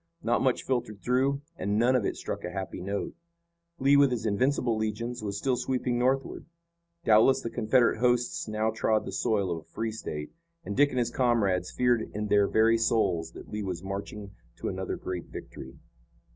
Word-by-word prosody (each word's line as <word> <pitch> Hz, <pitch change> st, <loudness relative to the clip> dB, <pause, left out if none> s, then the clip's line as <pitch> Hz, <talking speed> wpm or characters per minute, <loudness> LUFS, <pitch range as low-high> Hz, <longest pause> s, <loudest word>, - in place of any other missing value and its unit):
Not 120 Hz, +1 st, +1 dB
much 130 Hz, -2 st, +1 dB
filtered 110 Hz, -6 st, -2 dB
through, 135 Hz, +3 st, +1 dB
and 100 Hz, +1 st, -1 dB
none 120 Hz, +3 st, +4 dB
of 120 Hz, -5 st, +1 dB
it -, -, -2 dB
struck -, -, -5 dB
a -, -, -3 dB
happy 95 Hz, -1 st, -5 dB
note. 100 Hz, +2 st, -3 dB, 0.6 s
Lee, 140 Hz, 0 st, +4 dB
with 140 Hz, -1 st, +6 dB
his 120 Hz, -3 st, -3 dB
invincible 120 Hz, +3 st, +1 dB
legions, 110 Hz, +3 st, -3 dB
was 100 Hz, -2 st, -3 dB
still 130 Hz, +4 st, +1 dB
sweeping 125 Hz, -1 st, -1 dB
northward. 130 Hz, +4 st, 0 dB, 0.6 s
Doubtless 115 Hz, +5 st, +5 dB
the 115 Hz, -, -5 dB
Confederate 115 Hz, 0 st, +2 dB
hosts 120 Hz, -1 st, +1 dB
now 110 Hz, +1 st, 0 dB
trod 110 Hz, -1 st, +1 dB
the -, -, -5 dB
soil 100 Hz, -5 st, 0 dB
of 85 Hz, -, -2 dB
a 80 Hz, -, -20 dB
free 115 Hz, 0 st, -3 dB
State, 75 Hz, -8 st, -6 dB, 0.3 s
and 100 Hz, -, -4 dB
Dick 145 Hz, +1 st, +5 dB
and 130 Hz, -, -5 dB
his 120 Hz, -1 st, +1 dB
comrades 105 Hz, -9 st, +1 dB
feared 120 Hz, -2 st, +1 dB
in 105 Hz, 0 st, -2 dB
their 100 Hz, -1 st, +4 dB
very 115 Hz, +2 st, +3 dB
souls 85 Hz, -8 st, +1 dB
that -, -, -11 dB
Lee 105 Hz, 0 st, -4 dB
was 95 Hz, -3 st, -4 dB
marching 100 Hz, +1 st, -6 dB, 0.2 s
to -, -, -4 dB
another -, -, -3 dB
great 90 Hz, -2 st, -5 dB
victory. -, -, -10 dB
110 Hz, 185 wpm, -28 LUFS, 100-125 Hz, 0.6 s, with